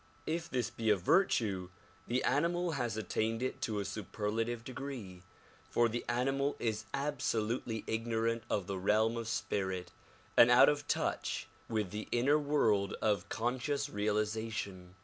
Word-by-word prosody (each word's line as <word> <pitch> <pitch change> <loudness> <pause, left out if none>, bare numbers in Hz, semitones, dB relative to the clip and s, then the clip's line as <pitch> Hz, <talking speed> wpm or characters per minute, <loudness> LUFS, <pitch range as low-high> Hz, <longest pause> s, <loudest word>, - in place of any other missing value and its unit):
If 165 +1 -2
this 125 -2 -1
be 115 -1 -1
a 105 - +6
virtue 100 - +2 0.4
the 125 +2 0
animal 170 +5 +1
has 120 -7 -2
attained 110 +3 -1
it 130 - -3
to 110 -2 -1
a 100 - -2
superlative 110 +3 -2
degree, 120 -8 -6 0.5
for 120 - +3
the 120 +1 -3
animal 135 +4 +1
is 110 -2 -2
absolutely 120 -5 -1
ignorant 115 0 0
of 100 - 0
the 95 0 -3
realm 110 +4 +3
of 115 -1 -4
spirit 95 -4 -2 0.4
and 120 - +8
out 125 +3 +8
of 145 0 -1
touch - - -1 0.2
with 105 -5 -1
the 105 +1 -5
inner 140 +5 +4
world 110 -9 +2
of 105 -4 0
conscious 125 +5 -1
realization. 105 -3 -2
115 Hz, 145 wpm, -33 LUFS, 105-130 Hz, 0.5 s, and